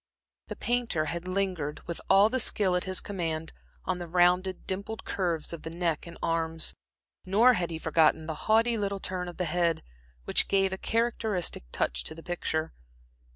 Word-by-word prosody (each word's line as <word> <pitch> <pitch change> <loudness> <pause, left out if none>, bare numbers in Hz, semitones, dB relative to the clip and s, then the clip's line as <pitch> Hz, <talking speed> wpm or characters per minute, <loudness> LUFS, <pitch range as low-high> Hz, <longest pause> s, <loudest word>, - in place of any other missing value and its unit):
The - - -5
painter 240 -10 0
had 170 +3 -4
lingered, 185 -6 -2
with 170 - -5
all 195 +2 +7
the 260 +3 -1
skill 200 -5 +2
at 180 - 0
his 185 -1 -1
command, 165 -5 -3 0.3
on 185 -1 -1
the 175 - -5
rounded, 180 +2 +2
dimpled 200 +4 -4
curves 170 -4 -1
of 165 - -6
the 160 - -6
neck 170 -1 -2
and 170 - -10
arms, 165 -1 0 0.5
nor 220 +7 +5
had 180 -6 -1
he 165 - -4
forgotten 160 0 +3
the 160 - -3 0.2
haughty 225 +1 +4
little 200 -1 -1
turn 185 -1 -3
of 175 - -8
the 180 - 0
head, 170 -2 +1 0.4
which - - +3
gave 195 -1 +2
a - - -3
characteristic 220 - 0
touch - - 0
to - - -3
the 165 - -11
picture. 160 -2 -2
180 Hz, 180 wpm, -29 LUFS, 165-195 Hz, 0.5 s, all